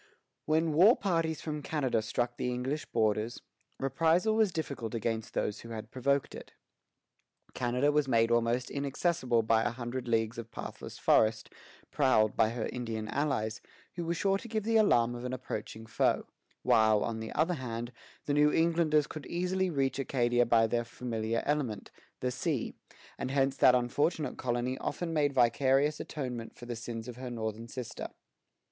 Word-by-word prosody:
When 160 +1 +2
war 190 +10 +7
parties 165 -5 0
from 150 -1 -4
Canada 140 -7 0
struck 120 +2 -2
the 125 - -2
English 130 +5 -3
borders, 110 0 0 0.4
reprisal 165 - +2
was 215 -3 +3
difficult 140 -9 -4
against 115 -1 -3
those 105 - -1
who 115 - -10
had 110 -2 -7
provoked 140 +2 0
it. - - -10 1.0
Canada 125 +4 +1
was 150 -1 +2
made 115 -2 +3
almost 120 +1 +1
inaccessible 140 -3 0
by 110 0 +3
a 120 - +1
hundred 120 +1 -5
leagues 115 0 0
of 115 -1 -7
pathless - - -8
forest, 110 0 +3 0.4
prowled 110 -7 +3
by 110 - +3
her 115 -1 -3
Indian 115 -3 -4
allies, 125 -7 -1 0.3
who 175 - -4
were 170 +1 -1
sure 195 +2 +1
to 235 - -9
give 220 -2 -2
the 225 +1 0
alarm 120 - +4
of 120 0 -7
an 125 0 -3
approaching 110 -3 -5
foe; 110 - +1 0.4
while, 110 -1 +4
on 115 -1 -3
the 110 - -6
other 165 +4 +2
hand, 120 -4 -4 0.3
the 145 - 0
New 150 +1 +4
Englanders 160 -2 +3
could 155 0 -8
easily 180 +2 0
reach 135 -4 0
Acadia 120 -3 +2
by 115 -1 +5
their 120 +1 0
familiar 115 -1 -3
element, 140 -8 -1 0.3
the 125 - 0
sea; 135 0 -2 0.5
and - - -2
hence 135 0 +1
that 125 - +6
unfortunate 135 +4 0
colony 125 +1 -1
often 170 -2 -3
made 145 -2 +2
vicarious 135 +3 +3
atonement 125 -6 -5
for 120 - -11
the 120 0 -4
sins 115 0 -6
of 125 -1 -7
her 130 0 -6
northern 110 -1 -4
sister. 125 -1 -6
125 Hz, 165 wpm, -31 LUFS, 115-150 Hz, 1.0 s, war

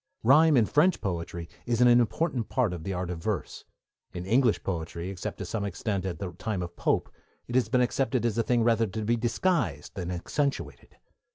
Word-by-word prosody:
Rhyme 150 +5 +6
in 115 - +5
French 155 - +3
poetry 85 -3 -4 0.2
is 120 -1 +1
an 125 - +6
important 120 +1 +2
part 125 -8 +1
of 85 -3 -6
the 95 - -3
art 90 -1 -3
of 85 -2 -5
verse; 105 0 -3 0.5
in 90 0 -5
English 115 +2 +2
poetry, 85 0 -4
except 95 - -5
to - - -5
some 110 -3 -3
extent 100 0 -2
at 90 - -4
the 95 -3 -5
time 95 +2 -3
of 85 0 -8
Pope, - - 0 0.4
it 120 - -7
has 125 -4 +2
been 125 +1 +3
accepted 125 -1 0
as 115 -3 +1
a 115 - +2
thing 120 0 +2
rather 115 -1 +3
to 105 +2 -4
be 120 +2 +2
disguised 120 - 0
than 90 -3 -5
accentuated. 140 - -3
110 Hz, 200 wpm, -28 LUFS, 90-125 Hz, 0.5 s, Rhyme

